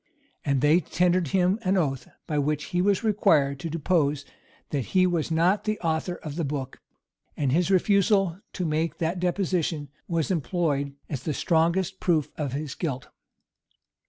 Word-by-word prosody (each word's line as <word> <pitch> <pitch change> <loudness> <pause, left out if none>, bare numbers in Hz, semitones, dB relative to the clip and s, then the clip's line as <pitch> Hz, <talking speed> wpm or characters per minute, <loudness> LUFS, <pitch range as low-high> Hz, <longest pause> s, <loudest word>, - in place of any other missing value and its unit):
[*] 280 - -40
And 140 -3 +1
they 150 +4 +5
tendered 180 +1 +1
him 185 +6 +2
an 190 -2 +1
oath, 135 -7 -1 0.2
by 150 -2 -1
which 150 +1 0
he 175 - +2
was 200 +2 +2
required 160 -10 +3
to 165 - -4
depose 150 -3 0 0.5
that 140 +1 -3
he 185 - +6
was 170 -4 0
not 170 +5 +2
the 215 -1 -1
author 165 +1 -1
of 155 -2 -8
the 170 - 0
book; 140 -2 -4 0.6
and 140 -3 +1
his 175 +5 +2
refusal 195 -1 +3
to 180 - -2
make 160 +1 -1
that 170 +2 -1
deposition 175 -5 -1 0.2
was 165 0 -1
employed 145 -3 -1
as 140 -5 -4
the 155 - -3
strongest 170 +3 +1
proof 160 -5 +1
of 145 -4 -3
his 145 0 -4
guilt. 140 -7 -4
165 Hz, 165 wpm, -26 LUFS, 145-185 Hz, 0.6 s, he